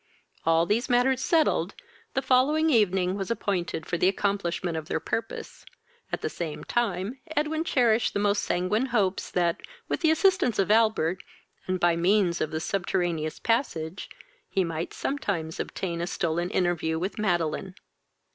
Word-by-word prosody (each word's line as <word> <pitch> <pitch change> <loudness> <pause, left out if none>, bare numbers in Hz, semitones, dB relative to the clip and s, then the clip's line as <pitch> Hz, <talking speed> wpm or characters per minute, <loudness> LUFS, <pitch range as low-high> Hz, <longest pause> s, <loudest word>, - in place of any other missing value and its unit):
All 165 0 +4
these 230 +8 0
matters 250 +1 +3
settled, 325 -2 +2 0.4
the 265 - +1
following 295 +5 +3
evening 190 -6 +3
was 195 -2 -4
appointed 185 -8 -2
for 170 - -2
the 180 - +4
accomplishment 190 -3 -1
of 160 -1 -4
their - - -1
purpose, 225 +7 -5 0.5
at - - -2
the - - -1
same 160 -3 -5
time 225 +1 -1 0.2
Edwin 310 +2 +1
cherished 240 -7 +2
the - - +1
most 205 0 +2
sanguine 205 +8 0
hopes 200 -6 0
that, 175 -2 0 0.3
with - - -1
the 320 - +4
assistance 365 - +3
of 195 +1 +2
Albert, 215 -6 +3 0.5
and 185 0 0
by 175 -1 +3
means 175 0 +2
of 155 - 0
the 160 - -3
subterraneous 175 -3 -1
passage, 200 - -1 0.4
he 190 - +1
might 165 -1 -3
sometimes 190 - -3
obtain 170 -3 -3
a 170 - -2
stolen 175 -1 -1
interview 170 -3 0
with 190 +6 -3
Madeline. 180 -2 -1
190 Hz, 155 wpm, -27 LUFS, 170-230 Hz, 0.5 s, All